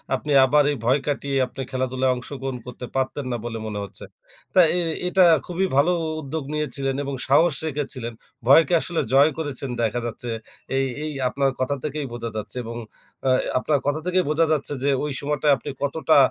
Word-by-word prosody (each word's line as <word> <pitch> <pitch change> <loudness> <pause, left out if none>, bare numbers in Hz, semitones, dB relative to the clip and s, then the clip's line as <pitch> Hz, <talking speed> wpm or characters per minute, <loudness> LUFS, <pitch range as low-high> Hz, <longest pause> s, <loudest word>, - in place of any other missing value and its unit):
আপনি 150 +3 -4
আবার 145 +3 +4
এই 145 - -2
ভয় 130 +4 +4
কাটিয়ে 140 -1 -1
আপনি 135 - -8
খেলাধুলায় 130 0 +1
অংশগ্রহণ 135 +1 -5
করতে 125 0 -7
পারতেন 135 +1 -1
না 120 - -1
বলে 115 -1 -4
মনে 105 -1 -4
হচ্ছে। 100 - -10 0.5
তাই 180 -3 +7
এ - - +2 0.3
এটা 185 0 +5 0.2
খুবই 180 +2 -1
ভালো 150 +6 +5 0.3
উদ্যোগ 155 +2 -4
নিয়েছিলেন 140 -3 -2
এবং 140 0 -4
সাহস 160 +4 +5
রেখেছিলেন। 130 -6 -4 0.3
ভয়কে 165 +6 +6
আসলে 175 -2 -2
জয় 140 +3 +6
করেছেন, 145 -4 -3
দেখা 115 +2 0
যাচ্ছে। 120 +1 -5 0.5
এই 135 - +2 0.2
এই 155 - -3 0.2
আপনার 135 0 +1
কথা 130 +2 0
থেকেই 150 -1 -3
বোঝা 115 -1 -4
যাচ্ছে 110 +4 -5
এবং 115 +1 -6 0.5
আ - - +5 0.3
আপনার 145 +2 +1
কথা 145 +2 +1
থেকেই 180 0 +2
বোঝা 160 +2 +3
যাচ্ছে 145 -1 0
যে, 140 - +2
ওই 150 - -2
সময়টায় 145 0 +2
আপনি - - -7
কতটা 155 +2 +2
140 Hz, 180 wpm, -23 LUFS, 130-150 Hz, 0.5 s, তাই